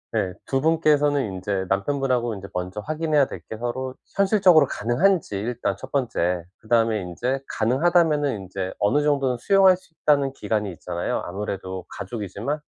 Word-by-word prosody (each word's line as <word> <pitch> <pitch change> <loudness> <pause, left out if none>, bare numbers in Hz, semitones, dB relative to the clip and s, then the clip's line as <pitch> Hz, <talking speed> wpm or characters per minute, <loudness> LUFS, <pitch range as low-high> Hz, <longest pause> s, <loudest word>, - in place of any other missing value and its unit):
예 90 -1 0
2 135 -1 0
분께서는 150 -3 +3
인제 95 0 -2
남편 100 +9 0
분하고 125 -4 0
인제 100 -1 -8
먼저 90 +3 -3
확인해야 155 +2 +1
될 - - -7
게 110 - -6
서로 130 +3 -3 0.2
현실적으로 190 -6 +5
가능한지 155 - +1
일단 110 -2 -2
1 130 +4 -10
번째 90 -10 0
그다음에 115 -1 +1
인제 120 +10 -2
가능하다면은 150 +3 +2
인제 95 0 -5
어느 145 +9 +2
정도는 140 -4 +1
수용할 190 - +5
수 170 - -25
있다는 140 -3 +2
기간이 105 -6 -2
있잖아요. 85 0 -3
아무래도 95 -1 -5
가족이지만 105 - -4
125 Hz, 375 characters per minute, -24 LUFS, 100-150 Hz, 0.2 s, 현실적으로